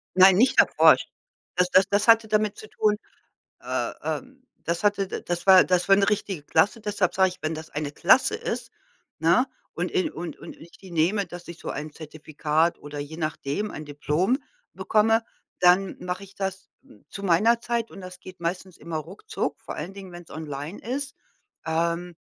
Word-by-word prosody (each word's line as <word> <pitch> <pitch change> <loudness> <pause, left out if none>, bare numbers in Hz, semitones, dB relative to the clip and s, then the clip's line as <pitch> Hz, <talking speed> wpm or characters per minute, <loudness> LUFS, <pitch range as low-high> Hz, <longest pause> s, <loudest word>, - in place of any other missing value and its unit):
Nein, 185 0 +8
nicht 245 +7 +4
erforscht. - - +5 0.5
Das 180 0 +2
das 190 +1 +5
das 205 +2 +1
hatte 225 -1 +6
damit 215 -1 +1
zu 215 - -10
tun 210 -1 +1 0.6
äh - - -2
äh, - - -2 0.4
das 170 +2 -2
hatte 205 -1 +2
da - - -5
das 175 +2 -4
war 190 -1 +8
das 180 +1 +1
war 195 - +7
'ne 200 -1 +2
richtige 195 -5 -1
Klasse. 180 +9 +2
Deshalb 205 -4 -1
sage 190 0 +4
ich, 185 - -11
wenn 155 +1 -1
das 160 0 -8
eine 145 -1 -4
Klasse - - +4
ist, - - -4 0.5
ne, 170 - +3 0.3
und 175 +1 -2
in 185 - 0
und 170 +1 -7
und - - -10
ich 170 - -15
die 190 - -14
nehme, 175 +4 +1
dass 175 +1 -10
ich 170 0 -9
so - - -6
ein 150 +1 -5
Zertifikat 155 +1 -1
oder 145 0 -8
je 145 +2 -6
nachdem 160 +4 -3
ein 155 - -7
Diplom 150 - 0 0.3
bekomme. 225 +1 +2 0.4
Dann 180 +2 +4
mache 180 +2 -4
ich 195 0 -17
das 195 0 -4 0.4
zu 200 - -8
meiner 210 +6 +3
Zeit, 235 -1 -2
und - - -11
das 180 -1 -10
geht 185 -1 -12
meistens 180 +2 -4
immer 165 0 -6
ruckzuck, 155 -3 -5
vor - - -8
allen 175 +6 -6
Dingen, 195 -2 -10
wenn's 175 -1 -11
online 155 +2 -6
ist. 275 +3 -4 0.5
Ähm, 170 +2 -1
180 Hz, 185 wpm, -25 LUFS, 160-200 Hz, 0.6 s, Nein